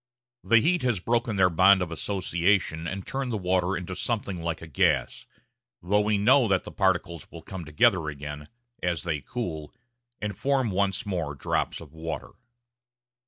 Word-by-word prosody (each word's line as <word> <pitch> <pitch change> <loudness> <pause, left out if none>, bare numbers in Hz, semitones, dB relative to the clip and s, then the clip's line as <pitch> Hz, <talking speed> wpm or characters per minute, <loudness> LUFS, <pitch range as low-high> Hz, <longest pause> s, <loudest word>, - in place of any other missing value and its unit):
The 115 +5 +5
heat 175 +5 +2
has 120 -6 +1
broken 115 +2 0
their 95 -2 +4
bond 95 +3 +6
of 85 - -6
association 90 -2 0
and 95 +1 -5
turned 135 -2 -3
the 110 - -1
water 90 0 +1
into 90 +1 -5
something 100 -3 -2
like 85 0 -2
a - - -9
gas; 75 -8 +1 0.6
though 100 +4 +3
we 105 0 +1
know 115 +5 +5
that 95 -2 +2
the - - -9
particles 85 -5 0
will 85 -2 -11
come 95 -1 -7
together 75 +1 +3
again, 75 0 -7 0.3
as 85 -2 -1
they 80 -4 -2
cool, 80 - -5 0.5
and 105 -1 -3
form 135 -5 +1
once 95 0 0
more 85 -7 -2
drops 70 - -1
of 80 -2 -13
water. 80 0 -5
90 Hz, 165 wpm, -27 LUFS, 80-105 Hz, 0.6 s, bond